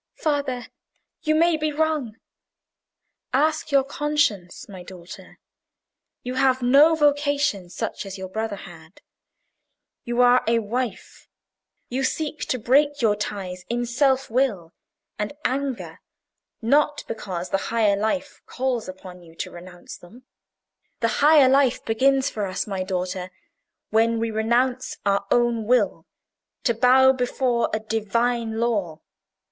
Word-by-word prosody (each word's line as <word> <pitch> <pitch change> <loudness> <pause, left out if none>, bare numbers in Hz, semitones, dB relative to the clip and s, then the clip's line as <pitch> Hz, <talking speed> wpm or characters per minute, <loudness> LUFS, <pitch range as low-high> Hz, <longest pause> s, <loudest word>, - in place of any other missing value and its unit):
"Father, 285 -5 -1 0.6
you 310 -1 +1
may 335 0 +3
be 310 0 -1
wrong." 300 -7 -1 1.2
"Ask 310 +3 +1
your 275 -1 +4
conscience, 280 -10 -1
my 190 -3 -10
daughter. 180 -1 -12 0.9
You 250 - -4
have 260 -1 +2
no 285 +6 +6
vocation 285 - +1
such - - -4
as 195 0 -7
your 190 0 -6
brother 220 +2 -3
had. 170 -3 -13 1.0
You 240 -1 -3
are 245 0 +5
a 230 +1 +3
wife. 230 0 -4 0.6
You 260 +2 -2
seek 305 +3 -2
to 255 - -1
break 280 +4 +2
your 210 -2 +4
ties 190 -3 -5
in 240 +1 -1
self 265 +2 +1
will 215 -10 0 0.5
and 210 +4 -3
anger, 270 -1 -2 0.6
not 290 +4 +2
because 185 -5 -5
the 195 - +1
higher 220 -3 +2
life 220 +8 -2
calls 250 -5 -2
upon 185 -1 -10
you 165 -1 -17
to - - -5
renounce 175 0 -11
them. 235 +9 -16 0.8
The 230 - +2
higher 295 -2 +7
life 270 -1 +2
begins 265 +4 +2
for 210 -7 -3
us, 185 0 -3
my 195 -3 -4
daughter, 185 0 -3 0.6
when 225 +1 +2
we 230 0 -1
renounce 240 +4 0
our 200 0 +1
own 240 -2 +2
will 250 +3 +1 0.6
to 235 - +2
bow 255 +3 +5
before 250 -1 0
a 215 - -1
Divine 225 +1 -1
law. 200 -9 -1
240 Hz, 130 wpm, -23 LUFS, 200-270 Hz, 1.2 s, higher